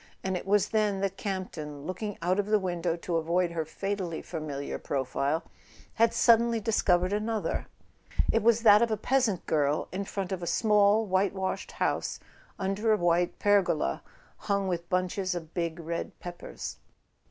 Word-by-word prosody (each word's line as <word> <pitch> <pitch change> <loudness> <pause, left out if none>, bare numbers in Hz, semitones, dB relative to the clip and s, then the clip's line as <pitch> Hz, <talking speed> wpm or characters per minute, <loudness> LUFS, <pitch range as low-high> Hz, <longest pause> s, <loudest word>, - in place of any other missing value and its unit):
And 190 0 -1
it 180 - -5
was 205 0 +3
then 210 -3 +1
that 195 -1 -1
Campton, 160 -8 -5
looking 195 +4 -4
out 185 +3 +2
of 205 - 0
the 215 0 +4
window 175 -3 -1
to 170 0 -2
avoid 170 +2 +1
her 165 -2 -2
fatally 185 0 -3
familiar 150 -4 -5
profile, 140 +4 -1 0.5
had 230 0 +3
suddenly 235 0 +4
dis¬ 225 0 0
covered 180 +1 +3
another. 215 +1 -1 0.6
It 225 - +2
was 230 0 +4
that 210 -1 +8
of 235 - +3
a 215 - 0
peasant 235 -4 +1
girl 150 -1 +1
in 195 +2 -3
front 195 -1 -4
of 185 -2 -3
a 175 - -4
small 210 +1 +4
whitewashed 190 0 -1
house, - - -1 0.4
under 195 +3 0
a 215 - +4
white 175 0 +1
pergola 190 - +2 0.4
hung 200 -1 -1
with 170 -2 -3
bunches 185 +1 0
of 165 -2 -7
big 170 -1 -2
red 170 +1 -4
peppers. 175 - -7
190 Hz, 165 wpm, -29 LUFS, 170-210 Hz, 0.6 s, that